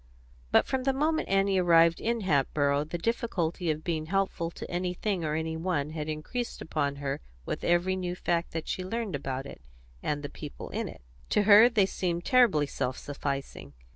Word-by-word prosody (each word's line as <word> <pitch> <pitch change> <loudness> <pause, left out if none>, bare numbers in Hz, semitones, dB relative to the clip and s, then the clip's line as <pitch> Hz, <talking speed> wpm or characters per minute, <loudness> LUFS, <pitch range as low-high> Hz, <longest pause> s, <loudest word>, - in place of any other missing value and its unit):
But - - +5
from 265 -1 -1
the 270 - +3
moment 310 +4 0
Annie 195 0 +3
arrived 170 -1 +5
in 235 0 0
Hatboro' 145 -3 +1
the 160 +3 -4
difficulty 180 -5 -1
of 155 0 -1
being 160 -3 -2
helpful 190 -2 0
to - - -8
anything 180 +1 -2
or 155 -1 -1
any 160 0 -2
one 160 -3 -1
had 155 -1 -4
increased 160 +11 -4
upon 145 -3 -1
her 140 - -3 0.2
with - - -4
every 175 +2 +2
new 180 -1 -3
fact 170 -1 -1
that 165 -1 -4
she - - -2
had 185 - -7
learned 225 -7 -2
about 135 -1 -4
it - - -10 0.4
and 145 0 -2
the - - -2
people - - -8
in - - -2
it. - - -12 0.3
To 210 - +3
her 215 +3 +8
they 215 -5 +3
seemed 175 -2 -2
terribly 235 - +4
self 130 -2 -3
sufficing. 140 - -5
170 Hz, 190 wpm, -29 LUFS, 150-195 Hz, 0.4 s, her